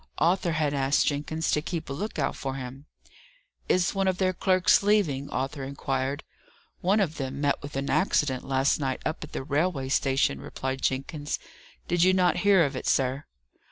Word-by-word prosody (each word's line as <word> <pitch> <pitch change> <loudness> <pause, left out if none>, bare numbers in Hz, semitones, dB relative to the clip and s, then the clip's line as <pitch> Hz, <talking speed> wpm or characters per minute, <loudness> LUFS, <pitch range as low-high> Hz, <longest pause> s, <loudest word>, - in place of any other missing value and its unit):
Arthur 175 +1 +2
had 155 -2 0
asked 135 0 +2
Jenkins 150 +3 -1
to 150 - +2
keep 165 0 -4
a - - -4
look 205 +8 -4
out 135 -3 0
for 135 -1 -4
him. 135 +2 -8 0.8
"Is 180 0 +2
one 195 -1 0
of 185 -1 +1
their 185 0 +1
clerks 185 0 +3
leaving?" 185 -10 +1
Arthur 135 +1 -3
inquired. 135 +1 -2 0.6
"One 195 +4 +2
of 170 -5 0
them 135 -1 -4
met 145 -1 +1
with 145 0 -8
an 135 +1 -2
accident 145 -9 +1
last 135 +2 +1
night 130 -3 -1
up 155 - -2
at 155 - -11
the - - -3
railway 145 -1 0
station," 135 - +1
replied 130 0 -4
Jenkins. 145 +3 -2 0.5
"Did 175 0 +1
you 185 +2 +5
not 180 -1 +3
hear 195 -5 +5
of 140 -1 -3
it, - - -4
sir?" 135 +2 +1
145 Hz, 185 wpm, -27 LUFS, 135-175 Hz, 0.8 s, you